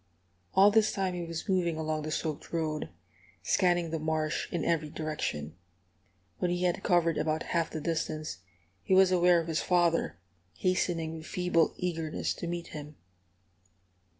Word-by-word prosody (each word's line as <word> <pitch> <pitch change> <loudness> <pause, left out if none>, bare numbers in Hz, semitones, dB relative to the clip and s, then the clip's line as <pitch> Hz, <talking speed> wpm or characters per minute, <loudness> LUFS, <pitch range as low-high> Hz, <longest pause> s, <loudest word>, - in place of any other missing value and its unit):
All 200 +2 +7
this 215 0 +4
time 190 -2 -1
he 175 -1 -3
was 165 -1 -5
moving 175 -4 +1
along 155 -1 -1
the 155 - -4
soaked 155 -1 -3
road, 155 -2 -2 0.5
scanning 175 -3 +2
the 165 - -1
marsh 155 0 -1
in 170 - -1
every 155 -2 +1
direction. 145 - -3 0.8
When 180 - +1
he 175 +1 -1
had 180 -1 +1
covered 170 -4 +2
about 155 0 0
half 165 -1 +1
the 160 - -4
distance, 155 - -2 0.4
he 190 - +2
was 190 -1 +6
aware 180 -1 +5
of 165 - -4
his 160 -1 0
father, 170 - +2 0.4
hastening 165 - 0
with 160 - -10
feeble 180 -2 +1
eagerness 165 -3 -2
to 170 - -6
meet 170 0 -4
him. 150 -2 -8
165 Hz, 155 wpm, -30 LUFS, 155-180 Hz, 0.8 s, All